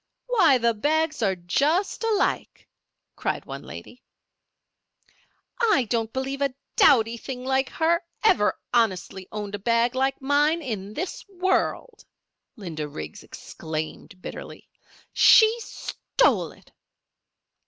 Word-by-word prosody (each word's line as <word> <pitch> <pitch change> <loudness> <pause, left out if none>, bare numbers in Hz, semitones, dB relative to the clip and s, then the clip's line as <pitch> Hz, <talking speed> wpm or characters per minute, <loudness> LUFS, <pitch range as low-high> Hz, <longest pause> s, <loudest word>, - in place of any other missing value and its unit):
"Why, 370 - +4
the 235 -1 +2
bags 310 +5 0
are 195 -3 +2
just 295 - 0
alike!" 440 -3 -1 0.5
cried - - -3
one - - -7
lady. - - -11 1.6
"I 420 - +3
don't 225 -2 0
believe 270 +2 -3
a 275 -2 0 0.2
dowdy 235 -5 +5
thing 250 +1 -7
like 265 0 +1
her 335 +2 +1 0.2
ever 210 - +3 0.2
honestly 190 -5 0
owned 210 -1 -5
a 205 - -4
bag 230 +3 +2
like 265 +1 0
mine 295 +4 +2
in 210 -5 -5
this 360 +3 -4
world!" 380 +6 -1 0.5
Linda 165 - -5
Riggs 80 - -8
exclaimed 160 +3 -7
bitterly, - - -9 0.5
"She 440 0 +7
stole - - 0
it." - - -21
260 Hz, 115 wpm, -25 LUFS, 210-320 Hz, 1.6 s, She